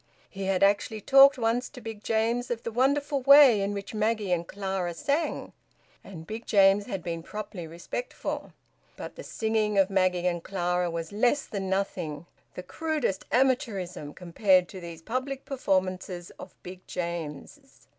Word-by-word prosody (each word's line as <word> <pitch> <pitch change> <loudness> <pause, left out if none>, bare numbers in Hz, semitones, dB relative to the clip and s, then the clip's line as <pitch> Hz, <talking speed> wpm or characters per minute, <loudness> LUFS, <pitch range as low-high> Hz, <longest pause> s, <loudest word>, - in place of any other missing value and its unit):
He 195 -1 -5
had 190 0 +1
actually 205 +2 +2
talked 275 +5 +7
once 235 +1 0
to - - -11
Big 220 -2 -8
James 230 +2 0
of 235 -1 -3
the 230 - -4
wonderful 280 +4 +1
way 275 -5 +8
in 200 +1 -1
which 200 +1 -6
Maggie 215 -2 0
and 170 -1 0
Clara 190 -3 -3
sang, 290 - -2 0.5
and 165 -5 -10
Big 220 +5 -7
James 200 -1 +4
had 195 -7 -4
been 165 -1 -4
properly 185 -2 -7
respectful. 170 - -5 0.5
But - - -8
the - - -8
singing 220 - -1
of 195 0 +3
Maggie 185 -2 +1
and 175 -2 0
Clara 180 -2 -1
was 165 -1 -5
less 245 +7 +1
than 195 -2 -4
nothing, 180 -5 -2 0.3
the 180 - -6
crudest 300 - -2
amateurism, 215 - 0
compared 185 +1 +2
to 190 - -9
these 170 -1 -9
public 260 +6 -3
performances 185 -7 -2
of 185 - -11
Big 180 0 -10
James's. 170 - -6
200 Hz, 155 wpm, -27 LUFS, 180-240 Hz, 0.5 s, way